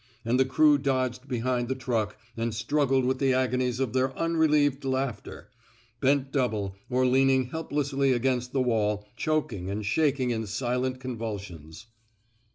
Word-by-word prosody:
And 120 Hz, +3 st, +1 dB
the 130 Hz, -, +5 dB
crew 145 Hz, +2 st, +4 dB
dodged 130 Hz, -1 st, -1 dB
behind 125 Hz, -1 st, -1 dB
the 130 Hz, -, -1 dB
truck 115 Hz, -5 st, -2 dB, 0.2 s
and 115 Hz, -1 st, -2 dB
struggled 135 Hz, +2 st, +1 dB
with 130 Hz, +1 st, 0 dB
the 135 Hz, -2 st, +2 dB
agonies 125 Hz, -1 st, 0 dB
of 130 Hz, -4 st, -1 dB
their. 130 Hz, 0 st, 0 dB
unrelieved 150 Hz, -4 st, +2 dB
laughter, 130 Hz, -4 st, -3 dB, 0.5 s
bent 135 Hz, 0 st, +1 dB
double, 110 Hz, -8 st, -1 dB
or 130 Hz, 0 st, +2 dB
leaning 130 Hz, 0 st, +3 dB
helplessly 140 Hz, -4 st, 0 dB
against 125 Hz, 0 st, 0 dB
the 130 Hz, -1 st, +1 dB
wall, 105 Hz, -3 st, 0 dB
choking 130 Hz, -, -1 dB
and 105 Hz, +1 st, -3 dB
shaking 135 Hz, +1 st, +1 dB
in 110 Hz, -2 st, -2 dB
silent 125 Hz, +4 st, -2 dB
con 130 Hz, -3 st, -6 dB
vulsions. 100 Hz, -6 st, -7 dB
130 Hz, 150 wpm, -27 LUFS, 115-135 Hz, 0.5 s, the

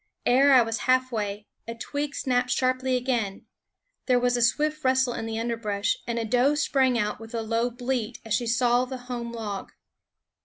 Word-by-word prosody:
Ere 270 Hz, +3 st, +5 dB
I 250 Hz, -, +7 dB
was 225 Hz, 0 st, -3 dB
halfway, 220 Hz, -6 st, 0 dB, 0.2 s
a 230 Hz, -, -5 dB
twig 285 Hz, +4 st, -4 dB
snapped 250 Hz, -1 st, 0 dB
sharply 255 Hz, +1 st, +1 dB
again; 240 Hz, -6 st, -2 dB, 0.6 s
there 250 Hz, -2 st, +4 dB
was 245 Hz, 0 st, +1 dB
a 240 Hz, -, 0 dB
swift 305 Hz, +6 st, +1 dB
rustle 260 Hz, -1 st, +2 dB
in 225 Hz, -, -4 dB
the 225 Hz, 0 st, -3 dB
underbrush, 225 Hz, -3 st, -1 dB
and 235 Hz, 0 st, -2 dB
a 230 Hz, -, -1 dB
doe 250 Hz, +6 st, +3 dB
sprang 265 Hz, -5 st, +2 dB
out 210 Hz, -2 st, -1 dB
with 225 Hz, +1 st, -9 dB
a 225 Hz, -, -2 dB
low 230 Hz, +2 st, 0 dB
bleat 245 Hz, -1 st, -3 dB
as 225 Hz, -, -2 dB
she 235 Hz, +1 st, 0 dB
saw 240 Hz, +1 st, +2 dB
the 260 Hz, 0 st, -6 dB
home 245 Hz, -1 st, -6 dB
log. 210 Hz, -4 st, -6 dB
245 Hz, 185 wpm, -26 LUFS, 225-255 Hz, 0.6 s, I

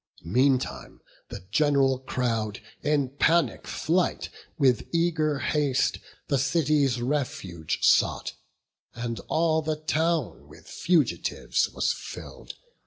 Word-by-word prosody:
Meantime 130 Hz, +8 st, 0 dB, 0.3 s
the -, -, -7 dB
gen'ral 135 Hz, 0 st, +3 dB
crowd, 115 Hz, -5 st, -2 dB, 0.2 s
in 145 Hz, -2 st, +1 dB
panic 145 Hz, 0 st, +1 dB
flight, 175 Hz, +3 st, 0 dB, 0.3 s
With 130 Hz, -6 st, +2 dB
eager 160 Hz, -3 st, +1 dB
haste 140 Hz, -2 st, 0 dB, 0.3 s
the 140 Hz, -2 st, +1 dB
city's 140 Hz, -2 st, +2 dB
refuge 125 Hz, -, -3 dB
sought, -, -, +2 dB, 0.6 s
And 115 Hz, -2 st, -4 dB
all 160 Hz, 0 st, +2 dB
the 155 Hz, 0 st, -1 dB
town 155 Hz, -2 st, -1 dB
with -, -, -16 dB
fugitives 170 Hz, -5 st, 0 dB
was -, -, 0 dB
fill'd. -, -, -9 dB
140 Hz, 105 wpm, -26 LUFS, 125-155 Hz, 0.6 s, gen'ral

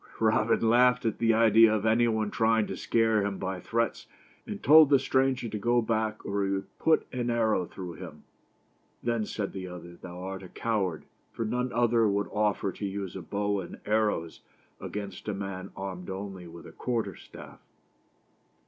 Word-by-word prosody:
Robin 115 Hz, -, +2 dB
laughed 125 Hz, +2 st, +4 dB
at 110 Hz, -, -1 dB
the 115 Hz, -1 st, +3 dB
idea 115 Hz, 0 st, +6 dB
of 110 Hz, -1 st, 0 dB
any 115 Hz, +2 st, +4 dB
one 110 Hz, -2 st, 0 dB
trying 110 Hz, -1 st, +2 dB
to -, -, -5 dB
scare 115 Hz, -2 st, +2 dB
him 100 Hz, -1 st, -2 dB
by 95 Hz, -1 st, -3 dB
threats, 115 Hz, +4 st, -2 dB, 0.4 s
and -, -, -6 dB
told 155 Hz, +1 st, +8 dB
the 140 Hz, -, +6 dB
stranger 130 Hz, -1 st, +1 dB
to 110 Hz, -1 st, -4 dB
go 120 Hz, +3 st, +2 dB
back 110 Hz, -2 st, -1 dB
or 100 Hz, 0 st, -1 dB
he 95 Hz, -, 0 dB
would 95 Hz, 0 st, -6 dB
put 160 Hz, -1 st, +3 dB
an 120 Hz, -1 st, -1 dB
arrow 110 Hz, -6 st, +1 dB
through 90 Hz, -3 st, -7 dB
him. 80 Hz, -, -10 dB, 0.4 s
" -, -, -40 dB
Then," 115 Hz, -3 st, 0 dB
said 100 Hz, -2 st, -4 dB
the 95 Hz, -1 st, -5 dB
other, 85 Hz, -1 st, -9 dB
" -, -, -32 dB
thou 90 Hz, -1 st, -8 dB
art 95 Hz, 0 st, -5 dB
a 95 Hz, -, -10 dB
coward, 100 Hz, -8 st, -2 dB, 0.3 s
for 115 Hz, -, -3 dB
none 125 Hz, +3 st, -1 dB
other 115 Hz, -1 st, +3 dB
would 100 Hz, 0 st, 0 dB
offer 105 Hz, -2 st, +1 dB
to 100 Hz, -, -6 dB
use 95 Hz, -1 st, -5 dB
a 95 Hz, -, -5 dB
bow 100 Hz, +3 st, -1 dB
and 90 Hz, -, -8 dB
arrows 105 Hz, -6 st, 0 dB, 0.4 s
against 105 Hz, 0 st, -6 dB
a 105 Hz, -, -1 dB
man 95 Hz, -1 st, -5 dB
armed 95 Hz, -2 st, -6 dB
only 95 Hz, -2 st, -6 dB
with 85 Hz, 0 st, -11 dB
a -, -, -10 dB
quarter 120 Hz, -3 st, -2 dB
staff." -, -, -13 dB
105 Hz, 190 wpm, -28 LUFS, 95-115 Hz, 0.4 s, told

